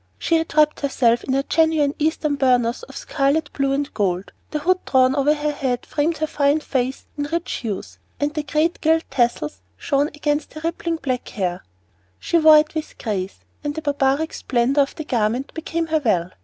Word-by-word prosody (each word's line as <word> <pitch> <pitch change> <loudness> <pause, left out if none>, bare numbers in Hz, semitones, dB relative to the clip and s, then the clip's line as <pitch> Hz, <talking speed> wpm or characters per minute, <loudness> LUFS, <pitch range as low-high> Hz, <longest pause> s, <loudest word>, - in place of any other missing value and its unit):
She 330 - +2
had 320 -1 -4
wrapped 300 0 +4
herself 240 -4 +2
in 265 - 0
a 275 - +1
genuine 315 -2 +2
Eastern 305 -1 0
burnous 250 -3 +2
of 485 - -10
scarlet, 280 +3 0
blue, 275 -1 0
and 280 +1 -1
gold; 190 -2 -1 0.2
the 305 - -2
hood 365 +5 +1
drawn 260 0 +3
over 290 +2 +3
her 300 0 -1
head 260 -4 -2
framed 310 +2 0
her 310 - 0
fine 290 0 +2
face 260 -3 -2
in 290 - 0
rich 335 +3 -3
hues, 215 -6 -5 0.2
and 290 +1 0
the 305 - -1
great 305 +3 0
gilt 320 +1 +3
tassels 235 - 0 0.2
shone 280 - +1
against 295 0 -2
her 310 - -7
rippling 335 0 -1
black 255 -6 -3
hair. 180 -4 -3 0.5
She 335 - +1
wore 310 -1 +8
it 305 0 +2
with 315 -1 -5
grace, 195 -4 -4 0.2
and 290 0 -3
the 315 - -5
barbaric 285 +1 +1
splendor 260 +3 +1
of 275 - -1
the 310 - -5
garment 245 -1 -1
became 330 +1 -2
her 315 -1 0
well. 180 -7 +1
285 Hz, 195 wpm, -22 LUFS, 255-310 Hz, 0.5 s, wore